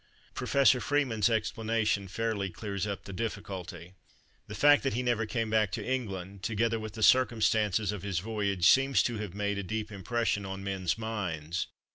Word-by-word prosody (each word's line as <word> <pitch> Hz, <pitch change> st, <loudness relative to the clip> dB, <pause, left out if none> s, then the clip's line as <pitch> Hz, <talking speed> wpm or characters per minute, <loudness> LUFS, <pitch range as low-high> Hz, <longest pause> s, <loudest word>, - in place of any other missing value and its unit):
Professor 135 Hz, -3 st, +3 dB
Freeman's 125 Hz, -8 st, +1 dB
explanation 110 Hz, -2 st, 0 dB
fairly 100 Hz, 0 st, -2 dB
clears 100 Hz, +3 st, -4 dB
up 100 Hz, -1 st, -4 dB
the 100 Hz, -, -8 dB
difficulty:—"The 95 Hz, -1 st, -8 dB
fact 145 Hz, +7 st, +6 dB
that 135 Hz, -5 st, -1 dB
he 125 Hz, -, -1 dB
never 120 Hz, -3 st, 0 dB
came 110 Hz, 0 st, -2 dB
back 110 Hz, -3 st, +2 dB
to -, -, -3 dB
England, 100 Hz, -7 st, -4 dB
together 115 Hz, +3 st, 0 dB
with 110 Hz, -1 st, -7 dB
the 110 Hz, 0 st, -3 dB
circumstances 110 Hz, -5 st, +3 dB
of 105 Hz, -3 st, -5 dB
his 95 Hz, -2 st, -3 dB
voyage, 100 Hz, -2 st, -1 dB
seems 135 Hz, 0 st, +5 dB
to 120 Hz, -3 st, -2 dB
have 100 Hz, -4 st, -6 dB
made 100 Hz, 0 st, -1 dB
a -, -, -1 dB
deep 110 Hz, +3 st, -4 dB
impression 105 Hz, +1 st, -1 dB
on 95 Hz, 0 st, -6 dB
men's 95 Hz, -2 st, -1 dB
minds. 90 Hz, -7 st, -3 dB
105 Hz, 165 wpm, -30 LUFS, 95-115 Hz, -, fact